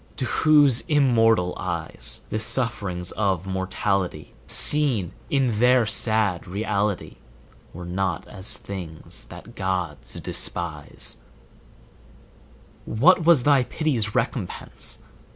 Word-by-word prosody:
to 130 - -2
whose 145 -4 +4
immortal 115 - +3
eyes 85 -3 -3
The 110 - -2
sufferings 100 -7 -1
of 95 -4 -1
mortality, 95 -3 -2
Seen 130 - +3 0.2
in 130 -6 +1
their 125 0 +5
sad 110 -4 0
reality, 100 +1 -2 0.5
Were 90 +1 -8
not 90 0 -2
as 95 0 -4
things 85 -6 -8
that 120 - -12
gods 90 - -3
despise; 80 -4 -2 1.7
What 165 +9 +4
was 165 -7 +6
thy 140 -2 +4
pity's 120 -11 -1
recompense? 120 -5 -3
105 Hz, 100 wpm, -24 LUFS, 90-125 Hz, 1.7 s, was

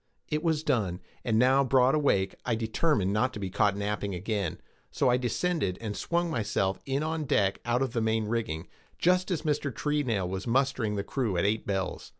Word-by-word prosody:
It 150 0 0
was 160 -2 0
done; 100 - 0 0.2
and 110 -2 +1
now 130 +3 +5
broad 130 0 +4
awake, 100 -11 +2
I 120 - 0
determined 110 - +1
not 130 +5 +1
to - - -6
be 95 -2 -4
caught 100 0 +2
napping 100 -1 -2
again, 100 -1 -2 0.3
so - - +1
I 125 - +4
descended 125 - -1
and 110 -3 -4
swung 170 0 -1
myself 105 -6 0
in 135 +2 0
on 160 -1 -2
deck 100 -7 +2
out 120 +2 +2
of 130 -3 -3
the 115 - 0
main 110 0 +1
rigging, 110 -7 -2 0.3
just 180 +2 +2
as 170 -5 -1
Mr. 150 -2 0
Treenail 125 -7 0
was 95 +4 -4
mustering 125 -3 +1
the 100 - -1
crew 110 -3 -1
at 85 - +1
eight 110 +2 0
bells. 95 -2 -2
115 Hz, 195 wpm, -28 LUFS, 100-140 Hz, 0.3 s, now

